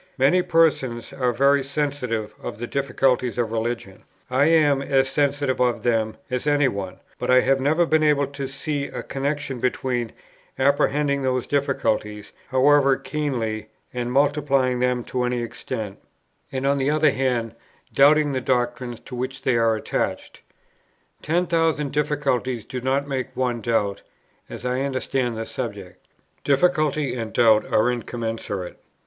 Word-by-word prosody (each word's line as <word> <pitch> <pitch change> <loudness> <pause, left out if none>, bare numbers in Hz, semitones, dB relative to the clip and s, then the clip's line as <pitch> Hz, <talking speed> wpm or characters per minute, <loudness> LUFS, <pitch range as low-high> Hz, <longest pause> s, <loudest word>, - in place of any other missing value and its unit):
Many 140 +8 +4
persons 135 -9 +1
are 125 -3 0
very 140 +3 +3
sensitive 135 -6 -2
of - - -6
the 120 - -4
difficulties 130 -2 0
of 115 -2 -1
Religion; 115 -3 -3 0.3
I 130 +3 +3
am 150 -4 +4
as 135 -1 +2
sensitive 140 -1 0
of 125 -1 +1
them 110 -2 0
as 125 +3 -2
any 145 -1 +3
one; 100 -5 -5 0.2
but - - -3
I 130 0 +6
have 135 +1 +2
never 155 +5 +3
been 160 -1 +2
able 150 -2 +3
to 140 0 -6
see 140 +1 -3
a - - -6
connexion 140 -1 -3
between 125 -1 -1 0.5
apprehending 140 +1 +2
those 130 -2 0
difficulties, 110 -7 -1 0.2
however 135 +1 +4
keenly, 115 -8 -3 0.3
and 125 -1 -3
multiplying 140 -2 +2
them 125 -1 +1
to 125 +1 -2
any 125 -1 -1
extent, 110 -3 -6 0.5
and 130 0 -3
on 140 0 +2
the 135 +1 +1
other 155 -1 +3
hand 125 -4 -1 0.4
doubting 145 +1 +5
the 130 -1 -1
doctrines 120 -1 -1
to - - -13
which 130 +2 -5
they 130 -3 +2
are 115 -1 +3
attached. 110 - -3 0.8
Ten 170 +4 +1
thousand 165 -4 +1
difficulties 140 -5 -1
do 125 - -5
not 135 +2 0
make 130 -2 -4
one 125 -2 -1
doubt, 105 -3 0 0.5
as - - -8
I 125 +1 0
understand 130 -3 -1
the 115 - -3
subject; 100 -8 -7 0.4
difficulty 150 -2 +2
and 115 -3 -4
doubt 110 -2 +3
are 110 +3 +3
incommensurate. 115 -6 -4
130 Hz, 150 wpm, -23 LUFS, 120-140 Hz, 0.8 s, I